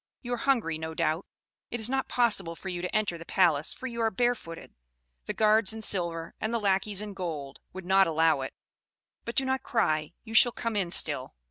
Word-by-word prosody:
You 245 0 -3
are - - -1
hungry, 230 - 0
no 160 0 -5
doubt. 165 +1 0 0.4
It 240 - -4
is 220 - 0
not 265 +1 -1
possible 205 -9 +1
for 190 - -7
you 175 -1 -4
to 180 - -4
enter 205 -6 0
the - - -8
palace, 165 -5 +2
for - - -9
you 235 -2 -4
are 225 - +3
barefooted: 220 -7 -2 0.5
the - - -3
guards 215 -1 +4
in 220 0 -6
silver, 170 -4 -1
and 220 - -1
the 235 - 0
lackeys 200 0 +1
in 210 -1 -7
gold, 155 -8 -5
would 190 -1 -8
not 190 +1 +5
allow 160 -3 +2
it; 130 - -6 0.7
but 235 - -5
do 270 - +2
not 265 0 0
cry, 155 - 0
you 225 - -9
shall 240 +1 +7
come 230 -2 -3
in 190 -4 0
still. 145 -6 +1
195 Hz, 215 wpm, -28 LUFS, 165-230 Hz, 0.7 s, shall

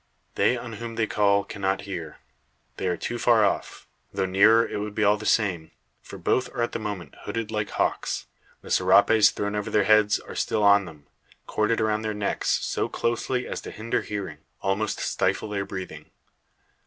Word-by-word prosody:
They - - +2
on - - -7
whom 115 -1 -6
they 110 - +1
call 100 -1 +2
cannot 95 -1 -2
hear. 90 -6 -7 0.6
They - - -2
are 90 - 0
too 120 - -4
far 115 -3 +4
off; 100 - -2 0.3
though - - -1
nearer, 105 +5 +5
it - - -4
would 105 0 -5
be 110 - +1
all 105 0 +5
the 105 0 -6
same; 90 -8 +1 0.3
for - - -10
both 125 -1 0
are 120 - 0
at 120 - -2
the - - -3
moment 100 -8 -5
hooded 115 -1 -3
like 105 -1 -2
hawks. - - -1 0.4
The - - -9
serapes 100 +3 +5
thrown 105 0 -3
over 105 -1 -2
their 105 - +3
heads 110 0 +4
are - - -10
still 110 - -1
on 100 -1 +5
them, 75 -4 -13 0.4
corded 110 +2 0
around 110 0 +1
their 110 -1 -3
necks, 105 -1 -1
so - - -1
closely 125 +2 -1
as - - -5
to - - -8
hinder 115 +2 -2
hearing, 100 -2 -5 0.2
almost 100 +2 -1
stifle 110 - -1
their 100 -1 -2
breathing. 95 -1 -8
105 Hz, 190 wpm, -25 LUFS, 100-110 Hz, 0.6 s, nearer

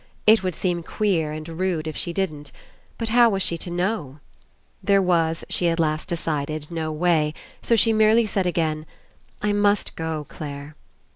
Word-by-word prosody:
It 220 0 +6
would 185 -3 -2
seem 175 -1 -1
queer 165 -4 0
and 155 +1 -6
rude 165 -1 -8
32 185 +1 +1 0.2
ENCOUNTER - - -2
if 155 - -7
she 170 - +1
didn't. 155 -6 -3 0.5
But 230 -1 -1
how 235 +1 +6
was 195 -3 +1
she 170 - +1
to 175 - -5
know? 175 -5 -2 0.6
There 200 0 +3
was, 165 -3 +1
she 175 - +2
at 165 0 -1
last 155 +1 0
decided, 155 -2 -3
no 160 -2 -3
way; 155 -1 +1 0.3
so 235 - +2
she 225 +1 +4
merely 220 +1 +4
said 195 -3 -1
again. 155 -3 -1 0.6
"I 210 0 +2
must 205 0 +1
go, 160 -2 -3
Clare." 145 0 -8
170 Hz, 185 wpm, -23 LUFS, 155-195 Hz, 0.6 s, It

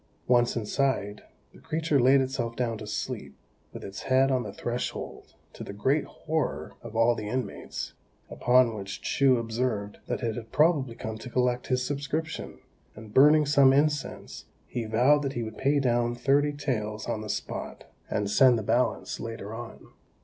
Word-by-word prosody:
Once 120 -1 +3
inside, 110 -2 -1 0.3
the - - -16
creature 160 -2 0
laid 135 +2 +5
itself 130 -3 -2
down 120 -2 -1
to 105 -1 -8
sleep, 105 - -4 0.4
with - - -9
its 100 0 -7
head 135 +1 +3
on 130 -1 +2
the - - -6
threshold, 120 +1 -5 0.2
to - - -8
the - - -7
great 135 +9 +1
horror 155 -9 -3
of 115 -1 -10
all 115 +1 +4
the 110 -2 -5
inmates; 130 +1 -4 0.3
upon 125 -1 +3
which 100 -2 -7
Chou 135 -2 +3
observed 115 -3 -2
that - - -3
it 115 -2 -1
had 115 -2 -8
probably 150 -7 +2
come 110 -1 -6
to 125 - -8
collect 125 0 0
his 125 0 0
subscription, 145 +4 -3 0.4
and 110 -1 -11
burning 150 +3 +6
some 140 -2 +5
incense, 150 +1 -1 0.2
he 120 -2 -4
vowed 125 +7 +4
that 140 -1 -2
he 120 - -2
would 110 -1 -7
pay 140 +2 +2
down 120 -2 +1
thirty 145 +4 +2
taels 110 -7 -3
on 110 - -2
the 105 - -7
spot, - - -5 0.3
and 100 -1 -1
send 125 +1 +6
the 110 - -3
balance 120 +4 0
later 115 -2 -6
on. 115 0 -9
125 Hz, 170 wpm, -27 LUFS, 110-135 Hz, 0.4 s, burning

